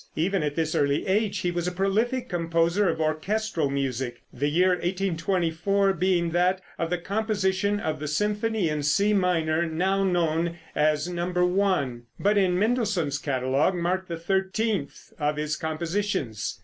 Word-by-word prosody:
Even 185 +4 +1
at 150 -1 -2
this 160 -1 0
early 140 0 +1
age 205 +2 +1
he 175 - 0
was 175 0 -2
a - - 0
prolific 215 +7 0
composer 170 +2 +1
of 160 -1 -2
orchestral 160 +1 0
music, 135 -3 -3
the 140 +4 -1
year 180 +5 +3
1824 185 +1 0
being 175 -1 +1
that 180 +2 +2 0.2
of 165 - -1
the 180 - 0
composition 200 +1 0
of 155 -6 -2
the 150 - -4
symphony 210 +5 0
in 150 -1 -1
C 200 +9 +2
minor, 170 -4 +1
now 190 +5 +1
known 170 -2 0 0.2
as 150 +1 +1
No. 175 0 -2 0.2
1, 180 -10 +1 0.2
but 205 +2 +2
in 185 -3 +3
Mendelssohn's 210 - 0
catalogue 135 +4 +1
marked 180 +2 -1
the 170 - -4
thirteenth 190 0 -2
of 150 0 0
his 150 0 -1
compositions. 160 - -2
175 Hz, 150 wpm, -26 LUFS, 155-195 Hz, 0.2 s, year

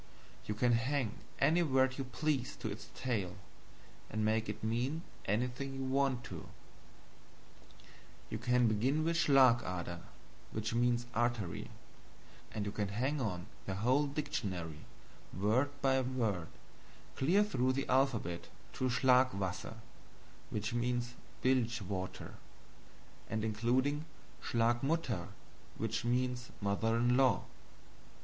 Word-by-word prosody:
You 105 - -1
can 120 +3 +3
hang 125 -1 0 0.2
any 155 +5 +4
word 130 -3 +2
you - - 0
please 135 -1 -1
to 110 - -4
its 105 - -8
tail, 100 -9 -1 0.7
and 110 0 -1
make 110 0 +1
it 105 +1 -5
mean 125 +9 -1 0.2
anything 125 +6 -1
you 135 - -3
want 130 -1 +1
to. 90 -10 -7 1.8
You - - -2
can 125 -1 +3
begin 125 +8 +2
with 165 +1 +1
SCHLAG 135 -7 +6
ADER, 85 -1 -4 0.5
which 110 +1 -2
means 120 0 +2
artery, 120 -6 -1 0.8
and 105 -2 -3
you 100 - -2
can 105 -1 -1
hang 130 +8 -1
on 90 -7 -2 0.2
the 95 - -1
whole 130 +8 +3
dictionary, 95 - -3 0.5
word 110 +9 +3
by 135 -1 +4
word, 115 -10 -1 0.7
clear 180 +10 +4
through 130 -11 +1
the 135 +1 -2
alphabet 125 -10 +1 0.3
to 130 - 0
SCHLAG 130 0 +4
WASSER, 95 -2 -3 0.7
which 105 +2 -2
means 120 0 0 0.3
bilge 120 -2 +2
water 95 -2 -5 1.0
and 110 0 -1
including 125 +7 +1 0.4
SCHLAG 120 +1 +2
MUTTER, 135 - 0 0.5
which - - -1
means 125 +1 0
mother 105 +3 +1
in 120 +1 +3
law. 135 -1 +4
120 Hz, 125 wpm, -34 LUFS, 105-130 Hz, 1.8 s, SCHLAG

